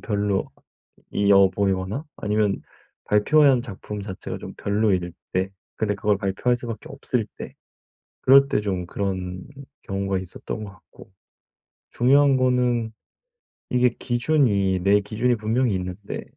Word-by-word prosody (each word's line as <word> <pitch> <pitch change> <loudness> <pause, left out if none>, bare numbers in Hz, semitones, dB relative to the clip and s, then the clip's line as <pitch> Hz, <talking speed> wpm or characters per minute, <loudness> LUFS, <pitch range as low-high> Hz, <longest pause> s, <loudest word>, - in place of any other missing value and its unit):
별로이어 100 -1 0
보이거나 100 +6 -1
아니면 105 -1 0 0.4
발표한 130 +4 +4
작품 105 -2 -7
자체가 95 -2 -6
좀 - - -9
별로일 100 -4 0 0.2
때 95 +1 0 0.3
근데 105 -2 0
그걸 100 0 +1
발표할 100 +6 0
수밖에 120 -3 -7
없을 - - -2
때 - - -8 0.7
그럴 140 +1 +7
때 - - +1
좀 95 -4 -3
그런 95 -2 -4 0.4
경우가 95 0 -2
있었던 95 +3 -6
것 100 - -8
같고. 95 - -18 0.8
중요한 135 +2 +4
거는 125 -3 +1 0.8
이게 125 0 +3
기준이 120 -7 +1
내 100 +2 +5
기준이 115 +5 0
분명히 110 +1 0
있는데 90 +2 -5
105 Hz, 265 characters per minute, -23 LUFS, 95-120 Hz, 0.8 s, 그럴